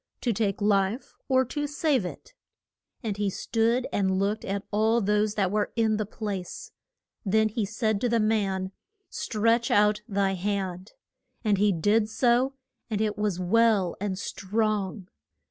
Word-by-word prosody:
to 240 - 0
take 205 -1 -1
life 205 +3 +1
or 260 -1 +3
to 295 +4 -3
save 290 - +1
it? 180 - -8 0.7
And 210 -3 -2
he 205 -1 0
stood 230 +5 0
and 190 -2 +1
looked 205 +3 0
at 200 0 -3
all 220 +3 +3
those 210 0 +1
that 195 -3 +1
were 210 0 0
in 220 -2 +2
the 215 -2 -2
place. 215 - -5 0.5
Then 220 +2 +2
he 215 0 -1
said 215 0 -1
to 245 - +1
the 230 0 +2
man, 195 -4 0 0.4
Stretch 230 -4 +1
out 210 0 +3
thy 195 -2 +1
hand. 190 0 -3 0.5
And 210 -3 +2
he 205 0 +4
did 210 +5 +2
so, 245 +3 +2 0.3
and 215 -2 -1
it 215 -1 0
was 210 -4 -1
well 200 -1 +3
and 200 -2 -2
strong. 200 -1 -2
210 Hz, 155 wpm, -27 LUFS, 195-230 Hz, 0.7 s, he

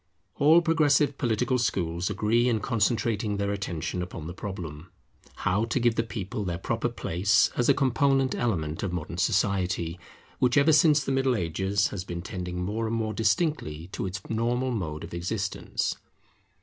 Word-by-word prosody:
All 160 +4 +6
progressive 150 -4 +3
political 125 +1 +1
schools 90 -5 -1
agree 110 +4 +2
in 115 -2 +1
concentrating 110 -2 0
their 100 0 -1
attention 90 -3 -3
upon 90 -3 -6
the 85 - -6
problem, 85 -5 -7 0.6
How 100 +5 +2
to 120 - -1
give 120 -1 +3
the 115 - +1
people 105 -3 -4
their 85 -3 -2
proper 95 - -1
place 100 +5 +2
as 120 - +1
a - - +6
component 135 0 +2
element 80 -10 -1
of 95 - -2
modern 85 0 -4
Society, 90 -4 0 0.4
which 125 +1 +3
ever 150 +2 +5
since 150 -1 +5
the 135 - -2
Middle 135 -1 +2
Ages 95 +3 0
has 95 -3 -5
been 85 -3 -6
tending 90 -2 -4
more 110 +4 -2
and 115 - -1
more 110 -1 -1
distinctly 105 - 0
to 95 - -3
its 95 +1 -4
normal 120 +3 0
mode 80 -9 -3
of 85 - -9
existence. 95 +4 -2
105 Hz, 165 wpm, -27 LUFS, 90-120 Hz, 0.6 s, All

